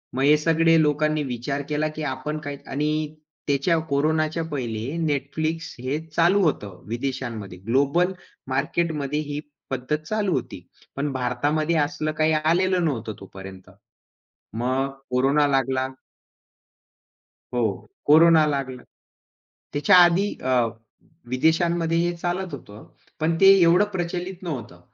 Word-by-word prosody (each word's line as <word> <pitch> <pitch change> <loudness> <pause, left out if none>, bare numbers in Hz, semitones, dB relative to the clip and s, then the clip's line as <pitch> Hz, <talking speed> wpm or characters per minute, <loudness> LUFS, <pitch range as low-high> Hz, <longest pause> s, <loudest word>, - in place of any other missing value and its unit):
मग 135 - 0
हे 150 +2 +6
सगळे 165 +1 +3
लोकांनी 150 0 +1
विचार 135 +2 -3
केला 150 +1 0
की 155 - -4
आपण 145 +2 -3
काही 145 -1 -6
आणि 150 +1 -1 0.3
त्याच्या 145 +4 +2
कोरोनाच्या 155 +3 +1
पहिले 120 -4 -3 0.2
Netflix 155 +3 -2 0.2
हे 135 +4 -1
चालू 170 +5 +3
होतं, 105 - -2
विदेशांमध्ये. 120 -5 -4
ग्लोबल 140 - +2 0.3
मार्केटमध्ये 150 +1 -1
ही 145 -1 -4 0.3
पद्धत 130 +3 -1
चालू 205 +1 0
होती. - - -4 0.3
पण 140 +1 -2
भारतामध्ये 145 +6 0
असलं 150 +1 0
काही 155 0 +3
आलेलं 175 +4 +2
नव्हतं 115 -7 -2
तोपर्यंत. 95 -1 -11 0.9
मग 130 +3 0 0.2
कोरोना 135 +4 +3
लागला. 135 -1 +1 1.7
हो, 120 -1 +2 0.4
कोरोना 160 +1 +7
लागला 135 -4 -3 0.9
त्याच्या 145 +5 +4
आधी 185 +4 +2
अ, 130 - 0 0.8
विदेशांमध्ये 165 +4 +2
हे 175 +1 +1
चालत 175 +1 -3
होतं. 105 -5 -11 0.3
पण 165 +1 +1
ते 195 - +7
एवढं 175 +4 +5
प्रचलित 180 0 -4
नव्हतं. 125 - -6
150 Hz, 120 wpm, -24 LUFS, 130-165 Hz, 1.7 s, कोरोना